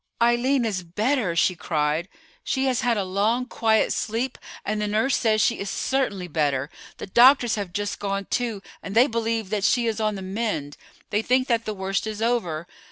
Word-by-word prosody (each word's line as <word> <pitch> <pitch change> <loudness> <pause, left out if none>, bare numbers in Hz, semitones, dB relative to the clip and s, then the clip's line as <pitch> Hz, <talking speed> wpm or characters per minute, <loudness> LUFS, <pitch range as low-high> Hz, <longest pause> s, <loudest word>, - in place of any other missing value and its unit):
"Eileen 240 +2 +3
is 200 -4 -1
better," 210 +2 0
she 180 +2 +3
cried; 155 +1 -1 0.3
"she 265 0 0
has 260 -1 +1
had 240 -2 +1
a 200 - 0
long, 210 +7 0
quiet 220 -3 +2
sleep, 235 +4 -2 0.3
and 210 +1 -1
the 210 - 0
nurse 220 +6 +1
says 215 -2 +2
she 235 - +1
is 200 - -3
certainly 200 -10 -1
better. 145 -4 0 0.3
The - - -6
doctors 240 +3 +5
have 200 -4 -3
just 205 +2 -3
gone, 195 0 -2
too, 230 -4 -2 0.2
and 200 - -7
they 240 +3 +7
believe 225 -4 -2
that 210 -2 -1
she 235 +3 +3
is 225 -1 -1
on 215 -1 0
the 190 - -6
mend. 190 -8 -3 0.4
They 210 0 +2
think 255 +3 +2
that 230 -1 +1
the 215 - -3
worst 195 +2 -2
is 215 -1 -5
over. 220 -9 -1
215 Hz, 195 wpm, -24 LUFS, 190-235 Hz, 0.4 s, they